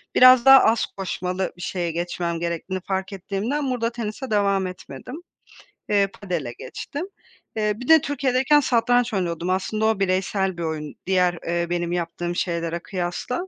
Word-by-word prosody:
biraz 255 -1 +8
daha 270 0 +10
az 225 +1 +3
koşmalı 185 -1 -3
bir 175 - -11
şeye 175 -2 -2
geçmem 170 0 -3
gerektiğini 170 +2 -3
fark 190 0 -2
ettiğimden 210 +9 -2
burada 235 -2 -1
tenise 235 +2 -5
devam 200 -2 +2
etmedim. 185 +7 -9 0.7
Eee, 200 -1 +3
padele 170 -11 -3
geçtim. 290 +5 -6 0.5
Eee, 210 -1 +1
bir 250 +4 -9
de 320 -1 +7
Türkiye'deyken 275 +1 +2
satranç 245 -2 +2
oynuyordum. 175 -2 -2
Aslında 215 +4 0
o 220 -2 +2
bireysel 190 0 0
bir 170 - -4
oyun, 155 -2 -4
diğer, 180 -2 +2
eee, 170 0 0
benim 175 -1 -1
yaptığım 175 0 -3
şeylere 170 -1 -2
kıyasla. 185 - -4
190 Hz, 150 wpm, -23 LUFS, 175-235 Hz, 0.7 s, daha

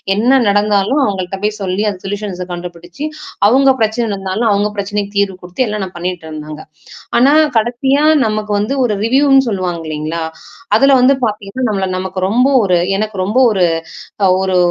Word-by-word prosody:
என்ன 250 +6 +3
நடந்தாலும் 205 +6 +2
அவங்கள்ட்ட 195 -2 -3
போய் 210 0 -1
சொல்லி 190 +1 -1
அது 185 -2 -8
சொல்யூஷன்ஸ 195 -2 -4
கண்டுபிடிச்சு, 175 - -7 0.4
அவங்க 270 +2 +4
பிரச்சனை 220 +2 +1
நடந்தாலும், 195 +4 -2
அவங்க 205 +1 +1
பிரச்சனைக்கு 205 0 -3
தீர்வு 200 -2 +1
குடுத்து 180 +9 -2
எல்லாம் 210 -1 -3
நான் 185 - -12
பண்ணிட்டு 175 -1 -4
இருந்தேங்க. 155 0 -8 0.6
ஆனா 265 +4 +5 0.3
கடைசியா 255 +6 +1 0.2
நமக்கு 215 -1 -2
வந்து 245 +7 -2
ஒரு 210 -3 -1
ரிவ்யூன்னு 270 +2 +4
சொல்லுவாங்க 180 -4 -3
இல்லைங்களா? 155 +2 -4 0.5
அதுல 275 0 +4
வந்து 270 +2 +5
பாத்தீங்கன்னா, 210 +4 -3
நம்மள 195 -2 -1
நமக்கு 185 0 -4
ரொம்ப 245 +6 +2 0.2
ஒரு 180 -3 +2 0.2
எனக்கு 215 -1 -3
ரொம்ப 215 +6 0
ஒரு 190 -3 +2 0.6
அ - - +3
ஒரு 190 -1 +1
205 Hz, 160 wpm, -15 LUFS, 185-230 Hz, 0.6 s, ஆனா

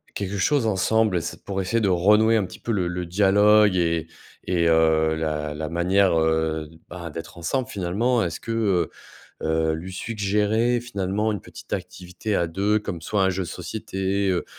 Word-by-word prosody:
quelque 100 0 -3
chose 120 +3 +2
ensemble? 105 -1 +2
C'est - - -7
pour 95 -1 -2
essayer 115 +5 0
de 100 - +2
renouer 105 +5 +4
un 105 - +1
petit - - -11
peu 120 - -3
le 90 -4 0
le 90 0 -3
dialogue 105 +2 +4
et 85 -2 0 0.4
et 90 -2 +1
et 85 - +3
heu, 80 -1 +3
la 75 -2 -2
la 80 0 -4
manière, 90 +1 +2
heu, 80 -1 0 0.2
bah, 85 -1 -7
d'être 80 +2 -8
ensemble 125 +10 -2
finalement, 110 +5 0
est-ce 85 -1 -4
que, 115 - -5 0.9
heu, - - -2
heu, 80 0 +1
lui 90 +4 -7
suggérer 105 +3 0
finalement 105 -2 -1
une 105 - -4
petite - - -13
activité 90 +4 -4
à 85 - +1
2 100 +5 +1
comme 100 -5 -6
soit 100 +4 0
un 95 - +3
jeu 95 +1 -2
de - - -8
société, 95 +2 -3
heu, 90 - 0
95 Hz, 185 wpm, -24 LUFS, 85-105 Hz, 0.9 s, renouer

